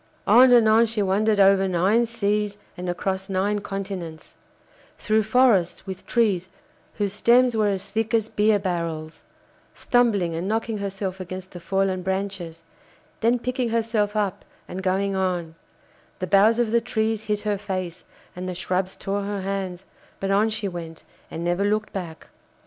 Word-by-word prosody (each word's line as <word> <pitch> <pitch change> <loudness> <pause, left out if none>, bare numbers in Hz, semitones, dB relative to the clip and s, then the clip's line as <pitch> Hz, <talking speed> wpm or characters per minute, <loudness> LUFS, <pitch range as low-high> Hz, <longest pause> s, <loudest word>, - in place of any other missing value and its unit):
On 255 +1 +7
and 235 -3 +6
on 225 +2 +5
she 215 -2 -1
wandered 205 +2 +2
over 195 0 +5
nine 195 +6 +2
seas 210 -2 -1 0.2
and 180 -1 -5
across 190 +2 -2
nine 200 +2 0
continents; 195 -5 -6 0.6
through 215 0 +2
forests 220 -6 +2
with 190 -2 -8
trees 200 -6 +1 0.5
whose 205 -2 -1
stems 245 +3 +4
were 215 -1 +2
as 195 -1 -1
thick 220 +2 -2
as 220 -1 +1
beer 210 -1 +2
barrels; 170 -4 -4 0.5
stumbling 210 -9 +2
and 170 +3 -3
knocking 225 0 -1
herself 195 -1 -4
against 185 0 -7
the 175 - -9
fallen 190 +1 0
branches, 190 -3 -4 0.6
then 235 +2 +3
picking 250 0 -2
herself 225 -2 0
up 205 -3 -1 0.2
and 190 - -6
going 195 +1 0
on; 180 -4 -1 0.6
the 185 - -3
boughs 200 +5 +4
of 240 -2 +1
the 235 0 +3
trees 220 -2 -1
hit 210 -1 -1
her 205 -1 -1
face, 185 -3 -4 0.3
and 180 +1 -5
the 180 - -4
shrubs 185 +1 -2
tore 200 +1 -3
her 200 0 -3
hands, 190 -1 -4 0.3
but 195 0 -1
on 205 +3 +3
she 220 -2 -2
went, 165 -3 -7 0.3
and 165 - -5
never 175 +3 0
looked 215 +1 0
back. 170 -4 -6
195 Hz, 160 wpm, -24 LUFS, 185-220 Hz, 0.6 s, On